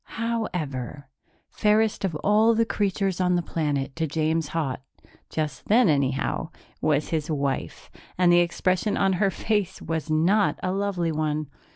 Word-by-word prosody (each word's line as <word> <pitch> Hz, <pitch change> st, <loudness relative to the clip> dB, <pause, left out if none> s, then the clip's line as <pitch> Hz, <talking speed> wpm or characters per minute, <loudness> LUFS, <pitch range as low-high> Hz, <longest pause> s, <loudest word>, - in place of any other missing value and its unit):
However, 150 Hz, -, -3 dB, 0.4 s
fairest 210 Hz, 0 st, +2 dB
of 185 Hz, -5 st, -1 dB
all 220 Hz, +2 st, +4 dB
the 230 Hz, +1 st, +3 dB
creatures 195 Hz, -3 st, -1 dB
on 180 Hz, 0 st, +2 dB
the 175 Hz, -, 0 dB
planet 145 Hz, -5 st, -2 dB
to 160 Hz, -1 st, 0 dB
James 160 Hz, +1 st, 0 dB
Haut 150 Hz, -5 st, -2 dB, 0.5 s
just 150 Hz, -5 st, -4 dB
then, 225 Hz, -1 st, +5 dB
anyhow 140 Hz, -3 st, 0 dB, 0.3 s
was 150 Hz, -1 st, +1 dB
his 160 Hz, -1 st, -2 dB
wife, 140 Hz, -, -3 dB, 0.3 s
and 175 Hz, -1 st, +5 dB
the 175 Hz, -, +6 dB
expression 185 Hz, +4 st, +1 dB
on 195 Hz, -1 st, +2 dB
her 200 Hz, -, +4 dB
face 205 Hz, 0 st, -1 dB
was 160 Hz, -1 st, -4 dB
not 180 Hz, +7 st, +2 dB
a 185 Hz, -, 0 dB
lovely 190 Hz, -4 st, -1 dB
one. 155 Hz, -1 st, -2 dB
165 Hz, 150 wpm, -25 LUFS, 150-200 Hz, 0.5 s, the